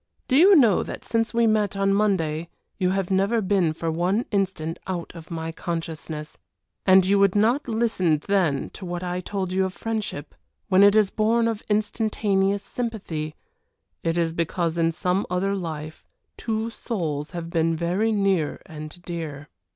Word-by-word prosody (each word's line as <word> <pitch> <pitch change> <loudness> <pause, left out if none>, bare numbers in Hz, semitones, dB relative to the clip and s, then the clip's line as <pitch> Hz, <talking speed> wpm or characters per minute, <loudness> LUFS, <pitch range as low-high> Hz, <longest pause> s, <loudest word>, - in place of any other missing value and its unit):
Do 255 - +2
you 375 +7 +8
know 235 - +5
that - - -7
since 225 0 0
we 235 0 +2
met 210 -3 +1
on 195 0 +2
Monday 170 -6 0 0.3
you 185 -1 +2
have 195 0 -1
never 195 +5 +2
been 190 -5 +2
for 165 +1 -3
one 180 +8 0
instant 185 -5 -1
out 180 -3 -4
of 165 -1 -11
my 165 -1 -4
consciousness. 160 -2 -5 0.5
And 190 0 +7
you 200 +1 +3
would 200 -1 +4
not 230 +8 +2
listen 220 -8 +1
then 180 -9 +1
to - - -10
what 175 0 -4
I 180 0 -2
told 190 -1 -3
you 190 +1 +2
of 190 0 -3
friendship 215 -10 -4 0.4
when 190 0 +5
it 200 +1 +7
is 210 -3 +4
born 230 +2 +2
of 225 -2 -2
instantaneous 205 -2 +1
sympathy 180 -11 -4 0.7
it 165 +1 0
is 165 -1 +1
because 170 0 -1
in 165 0 +3
some 180 +3 -1
other 185 +2 0
life 155 -4 -6 0.3
two 225 0 -2
souls 160 - -3
have 170 -1 -5
been 165 -1 +1
very 180 +7 0
near 195 -7 +1
and 155 +2 -9
dear. 155 -5 -6
185 Hz, 165 wpm, -24 LUFS, 165-210 Hz, 0.7 s, you